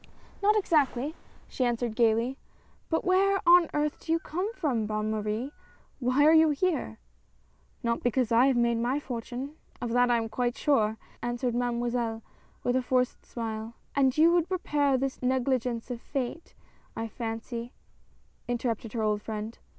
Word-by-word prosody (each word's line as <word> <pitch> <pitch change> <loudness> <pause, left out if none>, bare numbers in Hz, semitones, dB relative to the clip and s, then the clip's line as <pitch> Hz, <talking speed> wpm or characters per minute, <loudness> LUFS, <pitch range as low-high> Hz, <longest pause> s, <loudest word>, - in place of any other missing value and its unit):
" - - -26
Not 420 +1 +4
exactly," 295 - +1 0.3
she 260 - -2
answered 240 -2 -1
gayly, 230 +3 +2 0.3
— - - -35
"but 325 - 0
where 390 +1 +3
on 345 -1 +7
earth 295 0 -1
do 325 - -5
you 330 - +4
come 365 +6 -3
from, 255 - 0
Bonne 215 0 -1
Marie? 215 +5 -2 0.5
Why 255 +3 +3
are 315 - +7
you 320 0 +6
here?" 295 - -1 0.4
" 65 +1 -37
Not 235 0 0
because 245 -1 +1
I 235 +3 +5
have 270 - +3
made 235 -1 +2
my 250 +5 0
fortune 255 +3 -6
— - - -30
of 240 -2 -3
that 245 +1 +3
I 240 - +4
am 225 -1 -1
quite 240 +2 -1
sure! 220 -7 +2
" - - -28
answered 240 0 -1
Mademoiselle, 240 -2 -1 0.4
with 245 - +1
a 260 - +3
forced 250 0 0
smile. 225 -1 -5 0.2
"And 265 -1 +3
you 325 +2 +6
would 345 0 +2
repair 290 -7 +1
this 270 +1 -3
negligence 250 -2 0
of 240 -1 -5
fate, 275 +4 -4 0.4
I 225 - -3
fancy," 230 +1 -5 0.8
interrupted 235 -2 -2
her 225 -2 -1
old 210 -1 +1
friend. 215 +1 -5
245 Hz, 175 wpm, -28 LUFS, 230-285 Hz, 0.8 s, on